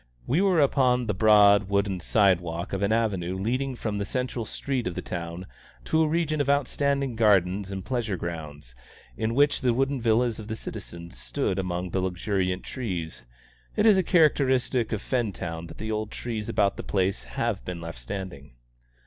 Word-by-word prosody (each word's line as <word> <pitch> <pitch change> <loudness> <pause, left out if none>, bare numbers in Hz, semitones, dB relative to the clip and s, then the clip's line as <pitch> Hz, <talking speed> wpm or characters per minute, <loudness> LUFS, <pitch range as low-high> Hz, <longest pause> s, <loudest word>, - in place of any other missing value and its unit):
We 150 +9 +2
were 190 -4 +3
upon 130 -3 +3
the 105 - 0
broad 100 -1 +5
wooden 100 -2 +1
side 95 -1 +3
walk 85 +2 -5
of 95 - -1
an 100 +1 +1
avenue 100 -6 0
leading 130 +7 -1
from 105 -3 -3
the - - 0
central 125 0 -2
street 130 0 -3
of 90 - -4
the - - -3
town 85 +1 -5 0.4
to 160 - +2
a 160 - +3
region 155 -1 0
of 140 - -1
outstanding 140 -2 +1
gardens 100 -3 +2
and 95 -1 -5
pleasure 115 -7 -1
grounds, 75 -7 -7 0.4
in 110 - -1
which 145 +1 +3
the 125 -3 +2
wooden 135 0 0
villas 115 0 +2
of 105 - -8
the 110 - -3
citizens 85 -4 -8
stood 100 -9 -2
among 90 -1 -3
luxuriant 95 0 -1
trees. 90 -11 -4 0.5
It 210 - +2
is 215 -3 +7
a 190 - +4
characteristic 135 - +2
of 110 -2 -2
Fentown 95 -9 -2
that - - -12
the 110 +1 -4
old 110 0 -2
trees 110 -3 -5
about 100 -1 +1
the - - -5
place 95 0 -1
have 115 -4 -2
been 90 -1 -5
left 85 -5 -7
standing. 70 0 -7
105 Hz, 180 wpm, -26 LUFS, 90-125 Hz, 0.5 s, is